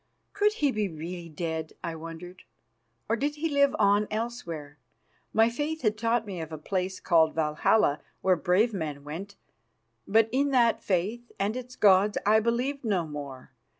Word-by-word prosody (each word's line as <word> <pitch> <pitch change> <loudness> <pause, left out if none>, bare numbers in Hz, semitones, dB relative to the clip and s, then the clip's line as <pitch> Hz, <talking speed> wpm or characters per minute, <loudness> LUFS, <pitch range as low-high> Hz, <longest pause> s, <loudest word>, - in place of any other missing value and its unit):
Could 415 +1 +2
he 290 -9 +1
be 210 -4 -1
really 170 +2 -7
dead, 160 0 -4
I 170 - -3
wondered, 165 +3 -9 0.7
or 230 - +2
did 290 +5 -1
he 310 +2 -1
live 280 -2 +3
on 205 0 +3
elsewhere? 170 - -5 0.5
My 225 +1 +4
faith 295 +6 -3
had 215 -2 +2
taught 230 +1 0
me 190 -5 -5
of 160 0 -7
a 155 - -5
place 185 +4 -3
called 160 -2 +3
Valhalla 150 0 +2 0.2
where 185 -1 +4
brave 190 +6 +2
men 150 -6 -4
went, 180 +8 -7 0.7
but 220 +2 +4
in 280 +3 +2
that 240 -4 +3
faith 210 +6 -2
and 200 +3 -1
its 255 0 -7
gods 200 +1 +4
I 215 +2 +5
believed 245 +5 -1
no 195 -7 0
more. 140 -4 -8
200 Hz, 165 wpm, -28 LUFS, 165-235 Hz, 0.7 s, I